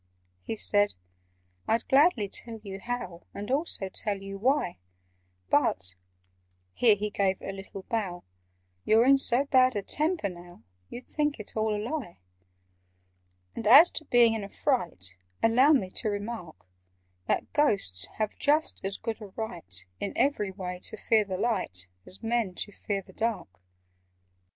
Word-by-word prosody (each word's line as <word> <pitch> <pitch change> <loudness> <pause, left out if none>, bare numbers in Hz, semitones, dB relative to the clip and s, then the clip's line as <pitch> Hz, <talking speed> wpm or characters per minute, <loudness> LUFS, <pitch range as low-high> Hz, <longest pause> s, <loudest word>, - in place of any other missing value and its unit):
He 220 - -5
said 205 -1 +2 0.7
"I'd 225 +1 +1
gladly 270 - +4
tell 225 +3 -5
you 195 -2 -7
how, 240 -7 -5
And 205 +4 -5
also 275 - +1
tell 200 +1 -2
you 195 0 -8
why; 255 - +1 0.7
But" 95 0 +1 0.8
(here 225 -4 +5
he 210 +1 -3
gave 195 -2 0
a - - -5
little 195 0 -9
bow) 195 -7 -3 0.6
"You're 225 +2 +4
in 275 +1 +6
so 260 +1 +3
bad 255 -3 +4
a 205 - -2
temper 310 - 0
now, 175 - -11 0.3
You'd 245 - -8
think 295 -3 -1
it 215 - -8
all 215 -1 +1
a - - -2
lie. 235 - -4 1.4
"And 220 - -3
as 280 +10 +9
to 310 - -5
being 240 -3 +5
in 220 -2 -3
a 200 - -7
fright, 175 - -1 0.3
Allow 255 +7 +5
me 190 -10 +1
to 215 - -2
remark 205 - -6 0.6
That - - -1
Ghosts 195 - +2
have 215 -1 -1
just 300 +2 +1
as 195 +1 -2
good 225 0 -5
a 210 - -7
right 190 - -5
In 200 - -3
every 270 -8 +1
way, 180 -2 -6
to - - -5
fear 215 0 +2
the 190 -2 -4
light, 140 - -1 0.2
As 190 - -12
Men 225 -5 0
to 205 - +4
fear 200 -1 -4
the - - -17
dark." 215 - -3
215 Hz, 155 wpm, -28 LUFS, 190-245 Hz, 1.4 s, as